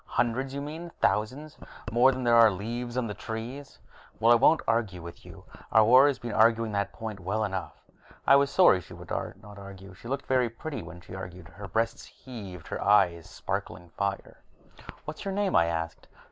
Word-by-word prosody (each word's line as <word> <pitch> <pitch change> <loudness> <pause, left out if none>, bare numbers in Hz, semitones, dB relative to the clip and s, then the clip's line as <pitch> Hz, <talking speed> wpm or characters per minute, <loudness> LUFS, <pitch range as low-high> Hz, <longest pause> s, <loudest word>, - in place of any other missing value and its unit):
Hundreds, 120 +3 0
you 140 +1 -4
mean; 160 +4 -7
thousands 130 +9 -1 0.3
more 120 +3 +5
than 130 0 -4
there 120 -1 +3
are 115 -1 +8
leaves 120 +5 -5
on 125 - 0
the 105 - -4
trees." 120 +7 -7 0.4
"Well, 115 +1 +5
I - - +8
won't 145 +7 +4
argue 115 -5 0
with 85 0 -10
you. - - -13 0.3
Our 110 -1 +6
war 130 +5 +7
has 140 - 0
been 120 -1 -6
arguing 110 +1 +3
that 100 -1 -1
point 110 -3 -7
well 105 +4 -2
enough." 95 -3 -4 0.5
I - - +7
was 140 0 +4
sorry 140 - +5
she - - -13
would - - -12
not 105 -1 -6
argue. 95 -1 -11
She 95 - -13
looked 135 +2 -3
very 130 -2 +2
pretty 140 +6 -6
when 85 - -11
she 90 - -13
argued, 90 -2 -8
her 100 +5 -10
breasts 115 +5 -1
heaving, 100 -10 -10
her - - -5
eyes 90 -5 +3
sparkling 85 +1 -5
fire. 100 +1 -4 0.7
"What's - - -7
your 195 -1 -3
name?" 200 -2 0
I 85 - +5
asked. 80 0 -4
110 Hz, 195 wpm, -28 LUFS, 95-130 Hz, 0.7 s, are